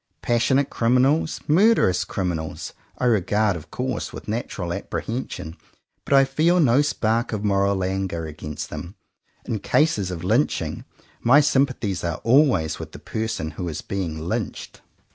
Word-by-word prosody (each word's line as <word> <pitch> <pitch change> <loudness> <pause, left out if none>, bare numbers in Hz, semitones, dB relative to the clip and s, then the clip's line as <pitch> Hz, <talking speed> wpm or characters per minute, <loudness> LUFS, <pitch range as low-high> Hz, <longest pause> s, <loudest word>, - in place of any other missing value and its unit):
Passionate 120 +4 +2
criminals, 130 +7 +2
murderous 170 - +4
criminals, 85 -5 -4 0.2
I - - -1
regard 105 -2 +2
of 80 -2 -9
course 125 +4 -3
with - - -9
natural 105 -5 -3
apprehen 120 +8 -4
sion, 80 +2 -7 0.5
but - - 0
I 135 0 +7
feel 160 +6 +2
no 135 -3 +5
spark 115 -5 0
of 105 -2 -3
moral 100 -1 +1
anger 95 -3 -2
against 75 -1 -7
them. 90 +4 -7 0.5
In 110 - -2
cases 105 - +1
of 90 -2 -5
lynching, 90 - 0 0.4
my 135 +5 +6
sympathies 130 - +1
are 85 -2 -1
always 120 - +3
with - - -8
the - - -8
person 110 -8 -3
who 85 +3 -4
is 75 - -5
being 90 -5 -3
lynched. 80 +2 -4
105 Hz, 145 wpm, -23 LUFS, 90-130 Hz, 0.5 s, I